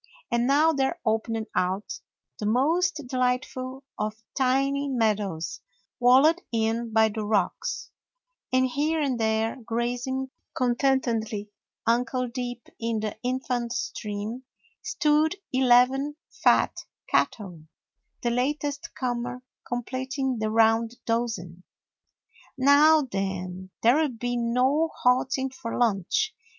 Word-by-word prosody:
And 235 +1 +2
now 300 +4 +4
there 275 +5 0
opened 225 0 0
out 185 +3 -1 0.4
the 210 - -2
most 305 +8 +2
delightful 255 +1 -2 0.2
of 210 0 -1 0.2
tiny 275 +2 +1
meadows, 210 -9 -1 0.4
walled 270 +8 +5
in 225 0 0
by 220 0 +4
the 215 0 -4
rocks, 205 -3 -1 0.6
and 255 0 +4
here 300 +5 0
and 270 -5 0
there, 220 +2 +1
grazing 245 +3 -2 0.2
content 260 +2 +2
edly, 220 -3 -2 0.4
ankle 250 +2 +1
deep 245 -1 -5
in 230 -1 -1
the 215 -1 -3
infant 250 -1 -2
stream, 215 +1 -4 0.4
stood 305 +2 +2 0.2
eleven 260 +3 +4 0.3
fat - - +4 0.3
cattle, 180 -7 0 0.6
the 240 - +1
latest 285 +3 -2
comer 245 0 -3 0.2
completing 260 +1 -2
the 215 0 0
round 225 +1 +3
dozen. 225 -7 -2 1.0
"Now 290 +3 +6
then, 190 -4 -4
there 255 +8 +5
'll 305 - +1
be 245 0 -3
no 250 +7 +2
halting 260 +1 +2
for 255 -3 -5
lunch. 240 - +1
245 Hz, 110 wpm, -26 LUFS, 225-265 Hz, 1.0 s, Now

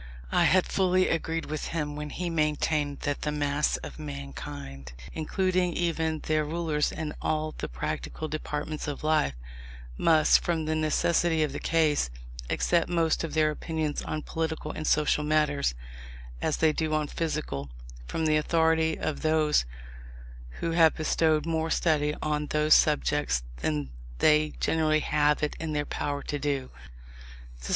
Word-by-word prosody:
I - - +4
had 185 -1 +4
fully 185 -1 +2
agreed 165 0 -1
with 155 0 -4
him 150 -3 -3
when 150 0 -5
he 175 +3 -3
maintained 150 -2 0
that 145 -1 -2
the 150 - -1
mass 145 0 0
of - - -9
mankind, 70 -2 -7 0.2
including 185 +2 0
even 160 -2 -1
their 155 0 +1
rulers 155 -1 -1
in 155 -2 -4
all 155 0 -1
the - - -4
practical 65 - -4
departments 150 0 -4
of 145 0 -5
life, 155 - +2 0.6
must, 160 -2 +5
from 165 -2 -1
the 155 - 0
necessity 155 +1 +2
of 150 - -1
the - - -4
case, 155 - +2 0.4
accept 170 -1 +1
most 165 -2 +1
of 165 - -4
their 155 -1 +3
opinions 155 -1 -3
on 155 -1 -4
political 160 -1 -3
and 155 - -5
social 150 0 +2
matters, 150 - +1 0.7
as 155 - 0
they 160 -1 +3
do 155 0 0
on 155 -1 +1
physical, 150 - -3 0.4
from 160 - -2
the 155 -1 +3
authority 160 0 +2
of 155 - -3
those 155 - +3 1.0
who 165 - 0
have 165 -1 +5
bestowed 155 -1 +1
more 160 -1 -1
study 150 -3 +1
on 150 -1 -1
those 150 +1 +3
subjects 145 - +2
than 75 0 -2 0.3
they 150 - +4
generally 155 -1 +2
have 150 0 +2
it 150 - -1
in 160 -1 -3
their 145 0 0
power 145 -1 -3
to 145 - -3
do. 140 -2 -2
155 Hz, 150 wpm, -28 LUFS, 150-160 Hz, 1.0 s, must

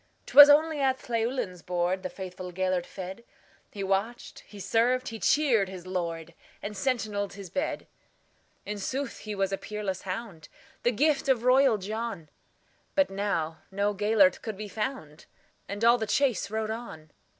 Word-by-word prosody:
'T - - -11
was 290 0 +12
only 310 +1 +4
at 265 -1 0
Llewelyn's 230 -6 -1
boardThe 180 +1 -1
faithful 185 -1 -7
Gêlert 185 -1 -1
fed; 190 +4 -8 0.5
He 200 - -6
watched, 195 +5 -2
he 205 - -12
served, 245 +5 +1
he 225 0 -7
cheered 235 -11 +3
his 185 -2 -9
lord, 170 -3 -4 0.3
And 210 0 -6
sentineled 210 -3 -1
his 195 -3 -10
bed.In 210 - -7
sooth 265 +6 -3
he 215 -1 -6
was 195 0 0
a 195 - -2
peerless 210 -3 -4
hound, 185 -5 -6 0.3
The 240 - +2
gift 280 +3 +1
of 245 -3 +3
royal 255 -2 +5
John; 205 -4 -5 0.7
But 285 -7 +3
now 180 -5 -2
no 200 +1 0
Gêlert 205 -1 +3
could 220 -3 -5
be 210 +1 -6
found, 205 - -5 0.4
And 205 +3 -2
all 240 +1 +6
the 220 - -2
chase 240 -1 +1
rode 220 0 -2
on. 160 -10 -8
205 Hz, 155 wpm, -28 LUFS, 185-240 Hz, 0.7 s, was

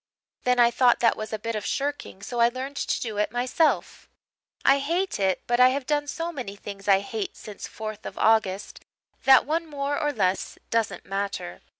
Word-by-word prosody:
Then 250 0 +3
I 240 0 +6
thought 245 0 +4
that 230 - +4
was 215 - -6
a 220 - -2
bit 230 +1 -4
of 210 - -3
shirking, 280 -8 -3
so 240 +3 -4
I 235 0 +6
learned 260 +3 -6
to - - -1
do 220 -3 -4
it 210 0 +1
myself. 255 +7 0 0.6
I 275 +1 +6
hate 340 - -1
it 190 -2 +1
but 240 0 +1
I 250 0 +8
have 270 0 -2
done 290 0 0
so 330 +3 -3
many 245 -10 -6
things 200 -1 -9
I 195 -1 +5
hate 390 - -5
since 210 -2 -8
4th 215 -1 -7
of - - -9
August 215 -3 +1 0.4
that 265 -1 +7
one 325 +3 -1
more 285 -1 -2
or 295 -1 +1
less 190 -7 -1
doesn't 230 -2 -1
matter. 195 - -4
240 Hz, 200 wpm, -25 LUFS, 210-280 Hz, 0.6 s, I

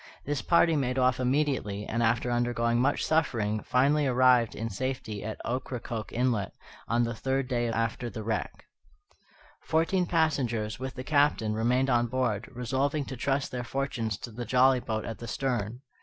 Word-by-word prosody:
This 145 -2 -1
party 170 -1 +4
made 130 -3 0
off 130 -1 +3
immediately, 125 -6 0
and, 115 - -2
after 115 +1 +1
undergoing 120 -1 +1
much 140 +3 +1
suffering, 110 -10 +1
finally 140 +3 +2
arrived 125 -2 +4
in 115 - -3
safety 115 -1 -4
at 110 0 -5
Ocracoke 120 -2 -4
Inlet, 115 -6 0 0.3
on 120 +1 +2
the 115 0 -1
third 130 +3 -1
day 120 -2 0
after 115 +1 -1
the 110 -2 -6
wreck. 110 +1 -3 1.0
Fourteen 170 +3 +1
passengers, 125 -11 0
with 130 0 -5
the 130 - -5
Captain, 140 -7 +2
remained 125 +4 +1
on 120 0 +3
board, 120 -3 -1
resolving 135 +4 -1
to 130 - -6
trust 135 +2 -1
their 125 -1 -3
fortunes 120 -5 -2
to 120 - -8
the 120 +3 -5
jolly 130 +2 +4
boat 110 -2 -3
at 115 - -6
the 120 - -7
stern. 120 -1 -2
125 Hz, 165 wpm, -28 LUFS, 115-135 Hz, 1.0 s, party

